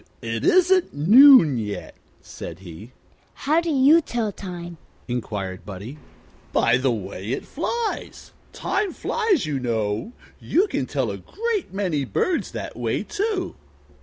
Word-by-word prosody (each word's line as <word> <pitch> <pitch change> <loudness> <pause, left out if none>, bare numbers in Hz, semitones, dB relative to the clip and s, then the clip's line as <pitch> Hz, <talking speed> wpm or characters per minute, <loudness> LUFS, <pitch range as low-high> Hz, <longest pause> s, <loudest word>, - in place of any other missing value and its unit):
"It 115 -1 -3
isn't 370 - +3
noon 195 - +7
yet," 105 -2 -5 0.3
said 80 - -8
he. 95 +5 -11 0.4
"How 310 +4 +1
do 340 - -3
you 295 +3 +5
tell 235 -7 -2
time?" 175 -3 -8 0.3
inquired 105 -6 -4
Buddie. 105 +9 -8 0.5
"By 115 +1 +3
the 130 +1 +1
way 100 -3 -5
it - - -4
flies. 450 +9 -4 0.2
Time 400 -2 -2
flies, 430 - 0
you 145 -3 -2
know. 110 - -2 0.3
You 370 +5 +2
can - - -3
tell - - -1
a - - -5
great 445 - -3
many 185 -7 -1
birds 330 - -1
that - - -6
way, - - -2
too." 405 -3 -2
175 Hz, 135 wpm, -23 LUFS, -, 0.5 s, noon